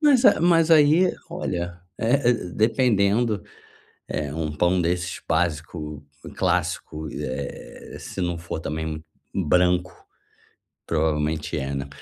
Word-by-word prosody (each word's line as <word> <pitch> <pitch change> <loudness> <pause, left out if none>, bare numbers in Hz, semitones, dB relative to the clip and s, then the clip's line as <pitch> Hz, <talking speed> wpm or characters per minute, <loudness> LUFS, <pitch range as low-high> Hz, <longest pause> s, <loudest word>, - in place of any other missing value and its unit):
mas 280 -5 +5
a 200 - +6
mas 165 -1 +4
aí, 160 +4 +6 0.2
olha, 85 0 -3 0.2
é 125 +2 +3
é, - - +6
dependendo, 110 0 +1 0.6
é 75 -1 -3
um 80 -2 -2
pão 90 +4 +2
desses 90 +2 -1
básico, 80 -2 -2 0.3
clássico, 80 0 -1
eh 65 +2 -6
eh, - - -7
se 95 - -7
não 85 -1 -1
for 85 -1 -5
também, 80 0 -4 0.3
um 95 - 0
branco, 90 0 +2 0.9
provavelmente 75 0 0
é, 70 0 -3
né, 70 0 -4
90 Hz, 125 wpm, -24 LUFS, 80-115 Hz, 0.9 s, a